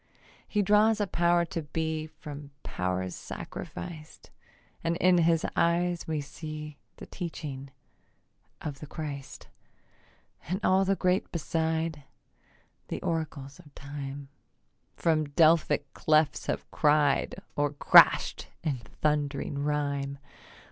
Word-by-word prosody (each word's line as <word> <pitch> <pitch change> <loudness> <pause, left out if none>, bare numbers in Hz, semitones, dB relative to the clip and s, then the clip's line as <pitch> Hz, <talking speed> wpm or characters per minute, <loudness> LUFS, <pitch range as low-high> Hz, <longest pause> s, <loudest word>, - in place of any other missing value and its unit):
He 210 -1 +1
draws 210 +2 +4
a 205 - +2
power 175 -1 +2
to 170 -1 -4
be 160 +1 -3
From 150 -2 -9
powers 90 0 -2
sacrificed; 160 -3 -8 0.5
And 165 0 0
in 180 0 +4
his 165 -1 +3
eyes 175 0 +1
we 155 -2 -1
see 150 +1 -8 0.2
The - - -10
teaching 145 -6 -6 0.9
of 145 -3 -5
the 150 - -8
Christ, 145 -3 -7 1.0
And 185 +3 -1
all 190 +1 +4
the 195 +1 +2
great 185 +1 +1
beside, 160 -2 -1 0.8
The - - -4
oracles 155 -4 -3
of 150 -5 -17
time 140 0 -7 0.7
From 155 -2 +2
Delphic 150 -2 +3
clefts 155 -1 +2
have - - -2
cried 150 -2 +3 0.2
Or 145 -1 +1
crasht 145 - +6 0.2
in 150 -5 0 0.2
thundering 145 -1 0
rhyme. 140 -1 -1
155 Hz, 115 wpm, -29 LUFS, 145-170 Hz, 1.0 s, crasht